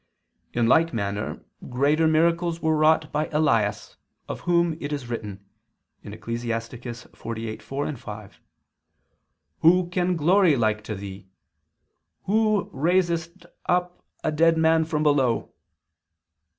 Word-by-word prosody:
In 120 -1 +1
like 160 +3 +3
manner 100 -1 -3 0.3
greater 145 +6 +2
miracles 170 +1 +2
were 160 -1 +1
wrought 155 0 +3
by 150 +1 -1
Elias, 115 -9 0 0.3
of - - -5
whom 170 -2 +3
it 145 - -4
is 140 -5 -4
written 100 -4 -6 0.6
(Ecclus. 115 0 -6
48:4, 115 +3 -5
5): 105 -2 -10 1.2
"Who 175 +2 +4
can 180 0 0
glory 170 +1 +4
like 110 -3 0
to 110 - -4
thee? 95 0 -9 1.0
Who 215 0 +1
raisedst 170 +2 0 0.2
up 180 0 0 0.2
a 155 - +1
dead 165 +2 +3
man 160 0 +3
from 155 -1 -1
below." 135 -6 +1
150 Hz, 110 wpm, -24 LUFS, 115-170 Hz, 1.2 s, Who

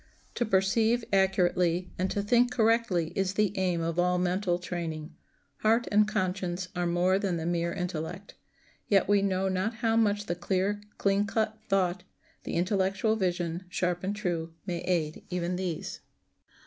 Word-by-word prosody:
To 240 - 0
perceive 220 +4 +2
accurately 180 -2 +2
and 185 +1 +1
to 200 - -1
think 240 +4 +4
correctly 220 -8 +2
is 190 0 0
the 210 -1 +1
aim 180 -3 0
of 165 +1 -1
all 180 0 +3
mental 180 0 +1
training. 165 -3 -5 0.4
Heart 225 +3 +2
and 210 0 +5
conscience 185 -3 -2
are 175 0 0
more 180 +2 +2
than 195 -4 -1
the 160 - -4
mere 170 0 0
intellect. 180 +2 -5 0.5
Yet 195 -2 +3
we 205 0 +4
know 190 -1 +1
not 190 +4 -1
how 225 -1 +1
much 205 -2 +2
the 175 - -1
clear, 190 +3 -1 0.2
clean 200 +1 +2
cut 220 +1 -1
thought, 185 -2 +1 0.4
the - - -4
intellectual 195 +4 +1
vision, 175 -3 -1
sharp 180 0 -1
and 200 +2 -1
true, 170 -5 -3
may 175 -3 -2
aid 160 -4 -1
even 180 0 -1
these. 180 -3 -4
185 Hz, 160 wpm, -29 LUFS, 175-205 Hz, 0.5 s, and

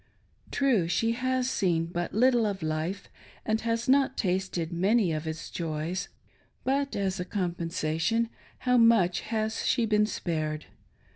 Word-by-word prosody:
True, 245 -11 +2
she 225 +7 +1
has 255 +1 0
seen 175 -9 +1
but 175 0 -3
little 240 0 +3
of 195 -4 -3
life, 155 +5 -2 0.4
and 220 0 0
has 230 +1 -1
not 270 +1 +3
tasted 180 -3 -1
many 195 +2 +2
of 155 0 -3
its 160 0 -5
joys; 165 +3 -3 0.5
but, 275 +1 0
as 195 -2 -1
a - - -1
compensation, 175 +3 -1 0.3
how 250 -1 +2
much 225 -7 +5
has 220 0 -2
she 240 -3 +2
been 210 -1 +3
spared. 155 -6 -3
195 Hz, 140 wpm, -28 LUFS, 170-230 Hz, 0.5 s, much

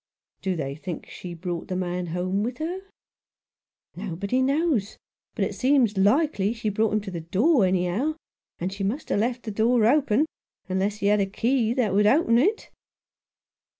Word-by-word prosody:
"Do 190 -1 -1
they 140 -4 -3
think 160 +3 -6
she 175 -2 -8
brought 175 0 -5
the 185 - -3
man 180 -1 -2
home 180 +4 -1
with 240 +3 -3
her?" 335 +5 -3 0.6
" - - -52
Nobody 200 +9 -1
knows, 275 - +1 0.4
but - - +1
it - - -4
seems 255 -5 +2
likely 210 +1 +2
she 225 -2 -2
brought 215 +1 +1
him 215 - +1
to 200 -1 -7
the 170 -2 -5
door, 210 - +3
anyhow; 185 - 0 0.4
and 185 +3 -3
she 195 0 -5
must 225 +10 -2
have - - +1
left 240 +3 -1
the 220 - -4
door 225 +2 +3
open 275 +1 +3 0.2
— - - -49
unless 190 +2 0
he - - -1
had 205 +1 +4
a 195 - +1
key 235 +3 0
that 235 -7 +1
would 205 +1 +4
open 235 -2 +4
it." 410 - 0
210 Hz, 185 wpm, -25 LUFS, 185-255 Hz, 0.6 s, had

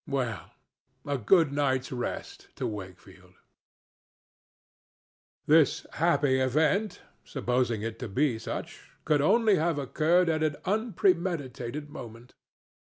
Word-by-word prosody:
Well, 125 -7 -3 0.6
a 145 -2 -2
good 160 - +4
night's 130 -3 0
rest 125 -2 -5
to - - -4
Wakefield! 95 -2 -9 2.1
This 155 -1 +4
happy 145 -5 +2
event—supposing 130 - -1
it 115 0 -5
to 125 - -5
be 125 +2 +1
such—could 145 +5 -3
only 215 +5 +4
have 160 0 0
occurred 160 +6 +2
at 160 -1 +1
an 155 -2 +1
unpremeditated 170 - -1
moment. 115 0 -10
140 Hz, 95 wpm, -28 LUFS, 120-165 Hz, 2.1 s, good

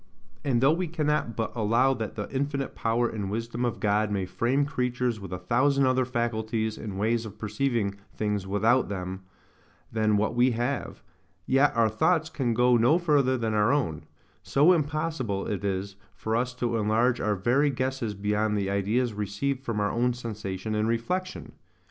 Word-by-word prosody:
And 125 -4 +1
though 135 +4 +5
we 180 +2 -1
cannot 150 -7 -1
but 115 +1 -3
allow 120 +4 +3
that 110 -4 -5
the 105 - -4
infinite 140 0 -2
power 115 +1 +1
and 105 -4 -4
wisdom 115 +3 -3
of 120 -2 -1
God 105 +1 +1
may 100 -2 -1
frame 130 +9 +1
creatures 125 -4 -1
with 95 -3 -9
a 90 - -3
thousand 130 +9 +2
other 130 0 +2
faculties 110 -2 -1
and 100 -3 -6
ways 115 +3 +1
of 110 -2 -9
perceiving 105 -1 -1 0.2
things 105 -2 -2
without 110 +6 +2
them 95 -1 -4 0.7
than 110 -1 +2
what 110 +3 0
we 120 +1 +3
have, 120 +3 -3 0.4
yet 135 +2 +4
our 115 -1 +4
thoughts 155 +9 +1
can 120 -7 -1
go 125 +1 +4
no 120 +8 +4
further 145 -7 +2
than 115 -2 -1
our 105 +2 +3
own: 125 - -1 0.4
so 140 - +4
impossible 150 - -1
it 100 -2 -3
is 100 0 -3 0.2
for 110 0 -2
us 125 +2 -1
to 120 -2 -1
enlarge 115 +3 +2
our 105 -1 +1
very 125 +9 +2
guesses 130 -4 -2
beyond 105 +1 0
the 100 -1 -1
ideas 105 +5 0
received 105 +7 -2
from 115 -4 -2
our 105 0 +1
own 120 +1 +1
sensation 110 -3 -5
and 105 0 +1
reflection. 180 +12 -2
115 Hz, 175 wpm, -27 LUFS, 105-130 Hz, 0.7 s, though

